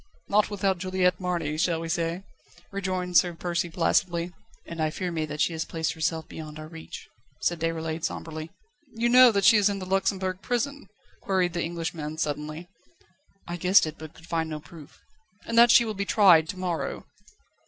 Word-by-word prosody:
"Not 210 +1 +3
without 195 -3 0
Juliette 185 0 +1
Marny, 170 -4 -2
shall 170 -1 +1
we 165 - -5
say?" 170 +2 -2 0.5
rejoined 185 -2 -1
Sir 175 -2 +3
Percy 175 0 -2
placidly. 170 +1 0 0.3
"And 165 -1 -6
I 155 - +2
fear 180 +3 -4
me 160 -2 -2
that 150 +1 -4
she 170 - +2
has 160 0 -2
placed 160 -1 -3
herself 160 0 -2
beyond 155 -1 -9
our 155 0 -8
reach," 160 0 -10 0.3
said 175 -1 0
Déroulède 160 0 -3
sombrely. 155 -1 -4 0.5
"You 235 +1 +1
know 250 0 +8
that 200 -2 +1
she 225 - +8
is 205 0 +4
in 200 - -2
the 190 - -6
Luxembourg 190 0 -1
Prison?" 280 +4 -2 0.3
queried 185 -3 0
the 170 - -2
Englishman 165 -2 -4
suddenly. 155 +2 -3 0.8
"I 175 0 -4
guessed 185 +2 +5
it, 155 0 -7
but 155 -1 -10
could 165 - -15
find 165 -2 -2
no 155 -1 -4
proof." 155 -1 -14 0.5
"And 230 - -4
that 240 0 +8
she 235 - +7
will 220 - -3
be 200 0 -3
tried 180 -7 +5
to 185 - -5
morrow?" 180 -3 -3
175 Hz, 185 wpm, -26 LUFS, 160-190 Hz, 0.8 s, know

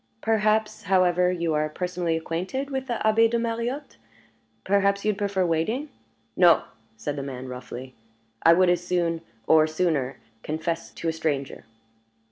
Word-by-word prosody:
Perhaps, 215 -1 +1
however, 180 -1 +3
you 170 -3 -1
are 155 0 +1
personally 175 0 -2
acquainted 185 - -3
with 265 -1 -3
the 240 -3 -2
Abbé 225 +1 +5
de 235 - +1
Mariotte? 235 - -3 0.7
Perhaps 200 +1 +2
you - - +3
would 210 - 0
prefer 200 -2 0
waiting 195 - -1 0.2
" 115 0 -42
"No!" 175 -3 +6 0.3
said 145 +4 -3
the 140 - -4
man, 130 -2 -6
roughly. 125 0 -8 0.5
"I 165 - +7
would 180 +1 +4
as 175 0 0
soon, 170 -2 0 0.2
or 155 +3 +5
sooner, 155 -5 0 0.2
confess 165 +4 -3
to 170 - -6
a 165 - +1
stranger." 145 -7 -3
175 Hz, 155 wpm, -25 LUFS, 155-210 Hz, 0.7 s, I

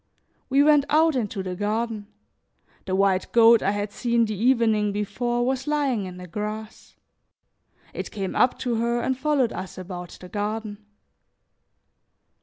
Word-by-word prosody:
We 275 +2 +4
went 295 -2 +5
out 315 0 +4
into 210 -5 -2
the 185 -1 -4
garden. 215 +1 -2 0.8
The 185 - -1
white 195 -1 +1
goat 230 -1 +6
I 195 - +1
had 205 0 -2
seen 235 +1 +1
the 215 - -3
evening 220 -2 +2
before 240 +4 -1
was 260 +1 -2
lying 280 -8 0
in 180 -1 -8
the 180 - -9
grass; 210 +4 -6 1.0
it - - -5
came 195 -3 -4
up 250 - +3
to 240 -3 -1
her 235 +1 0
and 260 +2 0
followed 270 -3 +1
us 185 0 -7
about 180 -1 -8
the 180 - -10
garden. 210 +1 -4
220 Hz, 150 wpm, -24 LUFS, 200-245 Hz, 1.0 s, goat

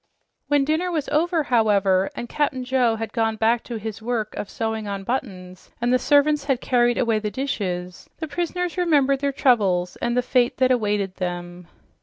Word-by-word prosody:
When 290 -1 +2
dinner 315 +5 0
was 315 -5 -2
over, 325 +2 +1
however, 200 -6 +2
and 240 - -5
Cap'n 265 -1 -1
Joe 250 -3 +2
had 225 0 -5
gone 225 -2 0
back 225 +2 +1
to 235 - -5
his 220 0 -6
work 225 -2 -2
of 205 - -5
sewing 220 -1 -3
on 200 -1 -4
buttons 185 -6 -5
and 240 +1 +1
the 255 - +4
servants 290 +1 +3
had 270 -4 +1
carried 240 -2 +2
away 230 -3 +1
the 210 0 -3
dishes, 185 -7 -4
the 320 - -5
prisoners 350 +2 -3
remembered 285 -6 +3
their 280 0 0
troubles 200 -10 +2
and 240 +1 -1
the 250 - +2
fate 250 -1 +1
that 260 0 +3
awaited 205 -5 0
them. 175 -1 -5
240 Hz, 185 wpm, -23 LUFS, 205-275 Hz, -, the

